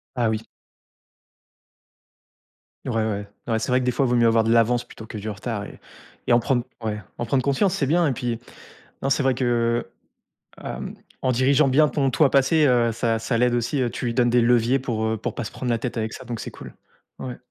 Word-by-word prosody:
Ah 120 -3 +1
oui. 110 -1 -1 2.5
Ouais, - - -1
ouais, 105 -2 -2 0.2
ouais 115 -2 +1
c'est 110 - -3
vrai 125 - +3
que, 125 - -2
des 125 - +2
fois, 130 +2 +1
il - - -1
vaut 120 - +2
mieux 120 - +4
avoir 115 0 +4
de 115 - +1
l'avance 120 +1 +3
plutôt 110 - -12
que 110 - -7
du 105 +1 -5
retard 105 0 -4
et - - -11 0.5
et - - +3
en 120 - +6
prendre 120 0 0 0.2
ouais, 105 -1 -2 0.2
en 120 - -2
prendre 130 +2 +1
conscience 175 +8 +1
c'est 145 - 0
bien 170 +4 +3
et 140 - +2
puis 120 -1 -3 0.6
non 135 - 0
c'est 140 - +2
vrai 130 - +3
que, 130 - -2 1.2
heu, - - -14
hem, - - -5 0.3
en 130 - +1
dirigeant 135 +4 +3
bien 150 +4 +5
ton 140 -3 +1
toi 145 +3 +4
passé, 140 +3 +4
heu, 120 -2 +3
ça 115 0 0
ça 115 +1 -1
l'aide 125 +1 +2
aussi, 120 +3 0
heu, 120 - +1
tu 125 - -5
lui 120 - -1
donnes 120 -1 +3
des 120 0 +4
leviers 120 +2 +3
pour, 115 -4 -2
heu, 110 0 0
pour - - -4
pas - - -3
se - - -6
prendre 125 - -4
la 120 - +2
tête 125 +1 -4
avec 110 -1 -2
ça - - -8
donc 120 -2 -5
c'est - - -6
cool. - - -11 0.5
Ouais. 125 -2 -6
120 Hz, 235 wpm, -23 LUFS, 115-130 Hz, 2.5 s, en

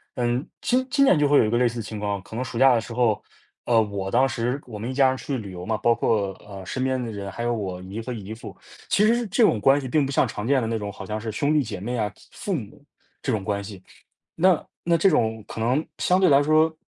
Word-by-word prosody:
嗯， 120 +2 0
今 255 +1 +1
今 275 -2 +4
年 185 - +5
就 145 -1 +2
会 145 - +5
有 - - +5
一 110 - 0
个 120 - +1
类 125 - +3
似 120 0 -1
的 115 - -2
情 110 0 -7
况。 100 -2 -2
可 110 - -11
能 125 - -1
暑 115 -2 -6
假 135 -1 +7
的 115 - +1
时 115 - -8
候， 115 -3 +1 0.4
呃， 115 -2 +4
我 100 -2 -3
当 130 +3 +4
时 120 +2 -2
我 110 -4 -7
们 115 +4 -5
一 - - -4
家 135 0 +4
人 130 - +1
去 135 0 -3
旅 105 -5 -7
游 90 0 -7
嘛。 110 +1 -1
包 115 +2 +3
括， 100 -4 0
呃， 95 -2 -9
身 130 +9 -3
边 130 -1 0
的 120 - -4
人， 100 -2 -6
还 115 +4 -5
有 120 - +1
我 95 -5 -4
姨 100 +4 -6
和 125 +3 -6
姨 110 -2 -6
父。 110 - -9 0.4
其 210 - +4
实 235 +1 +2
这 205 +6 0
种 110 - +2
关 135 +5 +5
系 135 - -5
并 145 +3 +2
不 135 - -4
像 135 - +2
常 105 -1 -5
见 135 +1 +3
的 115 - -2
那 115 0 -1
种， 105 -1 -5
好 - - -9
像 110 0 -4
是 110 0 -4
兄 145 +8 0
弟 150 -2 +3
姐 105 -5 -6
妹 120 +6 -3
啊、 105 -2 -1 0.2
父 200 - -4
母， 140 - -6 0.4
这 135 - -1
种 105 -5 -2
关 100 -1 -1
系。 100 -2 -9 0.6
那 180 0 +3 0.2
那 170 0 +3
这 190 +4 +4
种 110 -5 +1
可 - - -8
能 125 +7 +1
相 180 +1 +2
对 185 - +5
来 140 -1 +6
说， 155 +2 +3
120 Hz, 305 characters per minute, -24 LUFS, 105-140 Hz, 0.6 s, 假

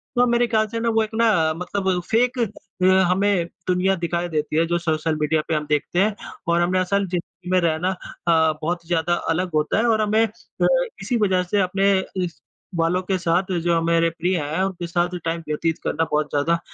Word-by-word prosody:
तो 245 0 +4
मेरे 240 0 +2
ख़्याल 220 -2 +1
से 230 +2 -4
ना 230 0 0
वो 225 -1 +2
एक 215 - -5
ना, 205 -9 +3
मतलब 180 +2 -1
फ़ेक 245 +3 +2
अ, 200 -4 -3 0.2
हमें 190 -2 +2 0.2
दुनिया 185 +1 +2
दिखाई 170 0 -2
देती 155 -1 -2
है, 165 - +3
जो 170 +1 0
सोशल 160 -1 -1
मीडिया 155 +1 +2
पे - - -1
हम 150 0 -1
देखते 150 +4 0
हैं 210 +1 +2 0.3
और 170 0 +2
हमने 180 +2 +2
असल 200 +2 +1
ज़िंदगी 175 0 -6
में 185 - +4
रहना 165 +2 +1 0.4
अ, 160 -2 +4
बहुत 170 +1 -2
ज़्यादा 175 0 +1
अलग 175 +2 0
होता 150 0 +1
है 220 - +2
और 220 -1 +3
हमें 215 +1 +3
अ, 215 - -3 0.3
इसी 245 - -1
वजह 190 -4 +2
से 200 +3 0
अपने 195 +2 +2 0.3
इस 170 -1 -6 0.3
वालों 170 +2 +1
के 185 +1 -1
साथ 175 +1 +1 0.2
जो 170 -1 +2
मेरे 165 0 +2
प्रिय 175 +2 -1
हैं, 155 +4 -2
उनके 180 -3 -3
साथ 175 +1 -1
टाइम 165 0 -1
व्यतीत 160 +2 -1
करना 165 - 0
बहुत 150 0 +1
ज़्यादा 145 +3 +1
अ, 170 - +1
180 Hz, 210 wpm, -22 LUFS, 165-200 Hz, 0.4 s, तो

